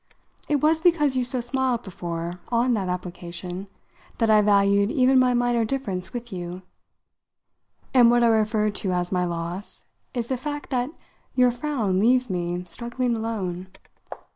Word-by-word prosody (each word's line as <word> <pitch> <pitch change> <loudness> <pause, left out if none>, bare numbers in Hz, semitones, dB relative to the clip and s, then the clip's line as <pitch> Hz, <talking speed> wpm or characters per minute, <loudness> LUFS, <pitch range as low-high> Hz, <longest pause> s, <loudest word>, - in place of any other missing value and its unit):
It 290 -2 +2
was 315 +1 +3
because 310 -6 +3
you 255 - +1
so 250 0 -2
smiled, 250 -1 0
before, 175 -2 -5
on 240 +1 +2
that 195 -5 -1
application, 180 +1 -6 0.5
that 225 -1 +2
I 215 -1 +6
valued 200 0 +3
even 260 0 +4
my 250 -1 +3
minor 240 -1 +2
difference 215 -7 -3
with 240 -3 -6
you; 180 0 -6 1.3
and 245 -3 +7
what 240 0 +4
I - - +5
refer 215 -1 +2
to 195 -2 -1
as 175 0 -1
my 180 -1 +1
loss 170 +3 -5 0.3
is 235 -2 -2
the 260 - 0
fact 290 +3 -5
that 250 0 0 0.5
your 250 -1 +5
frown 235 -7 -1
leaves 250 +1 +3
me 175 0 -2
struggling 240 +5 -2
alone. 195 -5 -3
225 Hz, 155 wpm, -24 LUFS, 185-250 Hz, 1.3 s, and